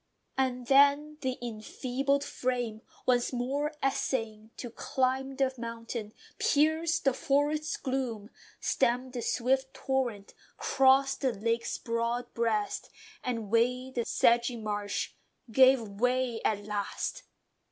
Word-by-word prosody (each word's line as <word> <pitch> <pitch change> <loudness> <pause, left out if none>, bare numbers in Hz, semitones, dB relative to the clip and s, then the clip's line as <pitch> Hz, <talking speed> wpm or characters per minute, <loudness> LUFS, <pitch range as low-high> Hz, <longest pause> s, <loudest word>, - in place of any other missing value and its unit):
And 255 -2 0
then, 285 +3 +4
th' 260 -2 -1
enfeebled 255 +5 -1
frame, 245 -5 -2 0.2
once 245 -1 +2
more 270 +4 -1
essaying 225 -5 -1
To 240 - -6
climb 265 +2 -1
the 265 -1 +1
mountain, 230 -2 -5 0.3
pierce 315 +3 +3
the 270 -5 +2
forest's 295 +4 0
gloom, 250 -6 -3 0.3
Stem 250 +2 +1
the 245 -1 -4
swift 265 +3 0
torrent, 245 -7 -2 0.2
cross 270 +1 +4
the 265 -2 0
lake's 230 +2 -1
broad 235 +1 -2
breast, 220 -3 -1 0.3
And 230 -5 -3
wade 250 +3 +2
the 240 - 0
sedgy 235 +1 +3
marsh, 205 -2 -2 0.4
gave 260 +2 +7
way 240 +3 0
at 205 -1 0
last! 205 -1 -3
250 Hz, 115 wpm, -30 LUFS, 230-270 Hz, 0.4 s, gave